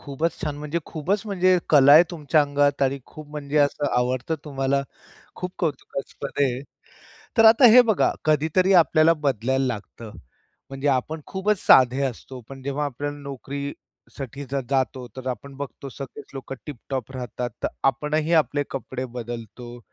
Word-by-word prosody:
खूपच 150 +4 -3
छान, 150 -2 -3
म्हणजे 150 +3 -3
खूपच 185 +6 -2
म्हणजे 185 -2 +3
कला 140 -2 +7
आहे 160 +3 +10
तुमच्या 155 -2 +1
अंगात 145 0 +1
आणि 135 +1 +1
खूप 155 -1 -12
म्हणजे 150 0 -5
असं 145 0 +2
आवडतं 130 +5 -1
तुम्हाला. 140 -1 0 0.5
खूप 180 0 -5
कौतुकास्पद 140 -4 -4
आहे. 130 -1 0 0.8
तर 225 - +7
आता 225 +4 +7
हे 250 +2 +9
बघा 210 - +3
कधीतरी 160 +5 +2
आपल्याला 165 -2 +5
बदलायला 135 -3 0
लागतं, 110 -1 -7 0.6
म्हणजे 135 +1 -3
आपण 150 +4 -1
खूपच 200 +1 0
साधे 130 +1 +6
असतो 130 +1 -6
पण 135 -1 -10
जेव्हा 140 +2 -2
आपल्याला 145 +2 -4
नोकरीसाठी 140 0 -8
जर 140 -1 0
जातो, 130 -2 -1
तर 130 0 -6
आपण 135 +2 -7
बघतो 140 0 -7
सगळेच 135 0 -9
लोकं 135 0 -7
टिप-टॉप 135 -3 -6
राहतात, 125 0 -4
तर - - +2 0.2
आपणही 150 +4 -1
आपले 145 -2 +2
कपडे 130 -1 -5
बदलतो. 120 +1 -7
140 Hz, 150 wpm, -24 LUFS, 130-155 Hz, 0.8 s, आहे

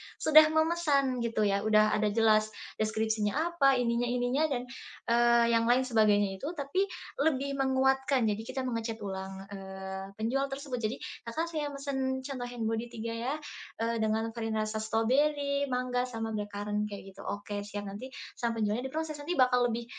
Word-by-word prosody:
sudah 310 0 +7
memesan 310 -5 +2
gitu 230 -2 0
ya. 200 -1 +2
Udah 215 0 +4
ada 215 0 +2
jelas 215 0 +4 0.3
deskripsinya 220 0 0 0.2
apa, 275 -5 +4
ininya 240 0 +1
ininya 250 +5 +1
dan, 250 -4 -2 0.5
eee, 235 0 +5
yang 230 0 +3
lain 250 +2 +4
sebagainya 205 -5 +2
itu, 290 - -4
tapi 310 +8 0 0.3
lebih 280 -2 +1
menguatkan. 265 -1 +2
Jadi 220 +2 -4
kita 260 0 -3
menge-chat 230 -2 -2
ulang, 190 0 -5
eee, 190 0 -7
penjual 260 +6 0
tersebut. 270 -2 -5
Jadi, 220 +1 -1 0.3
"Kakak, 325 +8 -2
saya 300 -2 -2
mesan," 265 -2 -2
contoh, 255 -3 -4
"hand 230 - -3
body 225 +2 -1
3 230 -1 -5
ya," 240 +5 -2 0.5
eee, 230 0 0
"dengan 220 +1 0
varian 225 -1 -3
rasa 215 0 -1
stroberi, 280 +6 +1
mangga, 250 0 -1
sama 225 -2 -4
blackcurrant." 210 0 -2
Kayak 195 -1 -8
gitu, - - -11
"Oke 205 0 -4
siap." 205 0 -5
Nanti 205 +6 -7 0.3
sama 230 -2 0
penjualnya 225 +5 0
diproses. 310 +1 -4
Nanti 330 +5 -3
bakal 250 -2 +4
lebih, 235 0 -2
235 Hz, 165 wpm, -30 LUFS, 215-270 Hz, 0.5 s, sudah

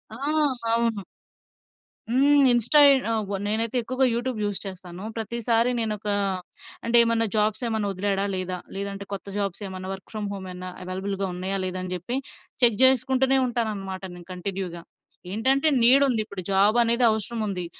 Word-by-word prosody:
ఆ! - - -9 0.6
అవును. 230 -3 0 1.1
హ్మ్. 280 +3 +4
ఇన్‌స్టా 240 +5 +4
ఎ - - +7 0.5
నేనైతే 225 +3 0
ఎక్కువగా 255 +3 0
యూట్యూబ్ 245 +1 -2
యూజ్ 205 -2 -1
చేస్తాను. 185 -1 -8
ప్రతిసారి 230 +1 0
నేను 225 -2 0
ఒక, 210 - -6 0.8
అంటే 235 +1 +3
ఏమన్నా 230 0 +1
జాబ్స్ 215 +2 +1
ఏమైనా 220 -2 -1
వదిలాడా 195 +1 -1
లేదా, 185 -1 -2 0.2
లేదంటే 200 0 -4
కొత్త 200 - -5
జాబ్స్ 200 0 -3
ఏమన్నా 185 0 -7
వర్క్ 190 0 -9
ఫ్రామ్ 210 -2 -4
హోమ్ 195 -1 -7
ఏమైనా 180 0 -7
అవైలబుల్‌గా 195 +2 -3
ఉన్నాయా 185 +2 -2
లేదా 185 0 -3
అని 185 - -6
జెప్పి 180 +8 -4 0.5
చెక్ 235 -3 +5
చేసుకుంటూనే 265 +1 +3
ఉంటాను 235 -2 -1
అన్నమాట 195 -1 -7
నేను 175 -1 -13
కంటిన్యూ‌గా. 180 -2 -5 0.5
ఏంటంటే, 265 +8 +2
నీడ్ 260 +4 +7
ఉంది 235 -4 +1
ఇప్పుడు 200 -3 -8
జాబ్ 200 +4 +4
అనేది 235 +1 +3
అవసరం 220 +2 -3
ఉంది. 185 -4 -3
210 Hz, 155 wpm, -24 LUFS, 190-235 Hz, 1.1 s, ఎ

